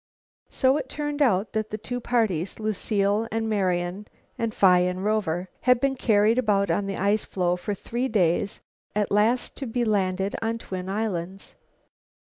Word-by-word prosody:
So 265 +1 +2
it - - -5
turned 295 0 -3
out 215 -6 +2
that 215 -1 -1
the 215 - -4
two 245 +3 -4
parties, 215 -8 0
Lucile 210 0 0
and 225 0 -1
Marian 185 -1 -1 0.3
and 230 -3 -2
Phi 185 -3 +5
and 180 +2 -1
Rover, 190 -5 0
had 250 -1 +4
been 275 +1 +1
carried 220 -1 +3
about 200 -6 +2
on 195 +4 0
the 195 - -3
ice 200 +3 +1
floe 180 -2 0
for 200 +3 -4
three 240 +6 -3
days 195 -3 +1 0.3
at 210 -1 0
last 220 +5 +2
to 270 - -4
be 240 +1 -1
landed 195 -2 0
on 225 +1 -1
twin 185 -4 -6
islands. 195 -3 -3
210 Hz, 165 wpm, -25 LUFS, 190-230 Hz, 0.3 s, Phi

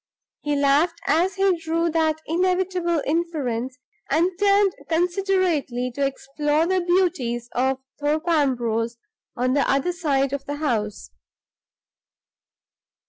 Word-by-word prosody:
He 295 -1 -1
laughed 290 +5 +2
as 360 +5 +2
he 390 -1 +3
drew 330 +1 0
that 315 -1 +1
inevitable 360 -1 0
inference, 275 -6 -2 0.3
and 330 +6 +2
turned 400 -1 +4 0.2
considerately 345 -7 0
to 280 - -2
explore 295 +3 0
the 370 +1 +1
beauties 345 -10 0
of 265 +1 +1 0.2
Thorpe 305 +3 -1
Ambrose 240 -7 +1 0.4
on 255 +1 +1
the 280 - +1
other 275 +6 +1
side 280 -6 0
of 280 -1 -3
the 290 - -4
house. 225 -9 -2
310 Hz, 115 wpm, -23 LUFS, 270-350 Hz, 0.4 s, turned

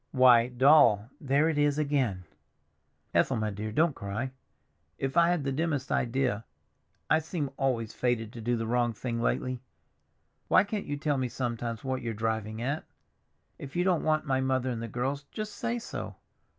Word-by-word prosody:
"Why, 125 -3 +6
Doll—" 125 -4 +5
"There 140 +3 +2
it 155 -2 0
is 145 0 +2
again!" 135 -11 0 0.9
"Ethel, 135 - +3
my 110 -1 -1
dear 105 +2 -4
girl, 155 +9 +4
don't 155 -5 -4
cry. 110 +6 -4 0.7
If 135 +1 -3
I 170 -1 +6
had 170 - +3
had 175 -5 0
the 135 - -1
dimmest 145 -2 -1
idea—I 115 - -2
seem 155 -3 -3
always 120 -5 -1
fated 115 -3 -1
to 115 - -8
do 120 +2 0
the 115 - -2
wrong 120 0 +1
thing 115 +1 -3
lately. 125 +1 -1 0.9
Why - - +5
can't 205 0 -4
you 145 - -2
tell 145 -2 0
me 130 - 0
sometimes 120 -2 -3
what 130 -1 -2
you're 115 -2 -3
driving 110 0 -2
at? 140 +5 -2 0.8
If 140 0 -9
you 175 - +2
don't 180 -3 +2
want 155 0 +1
my 130 -2 +1
mother 130 -1 0
and 115 -2 -4
the 115 - -4
girls, 135 +5 -3
just 215 -1 -5
say 235 0 -2
so. 235 - -6
130 Hz, 180 wpm, -29 LUFS, 115-145 Hz, 0.9 s, Why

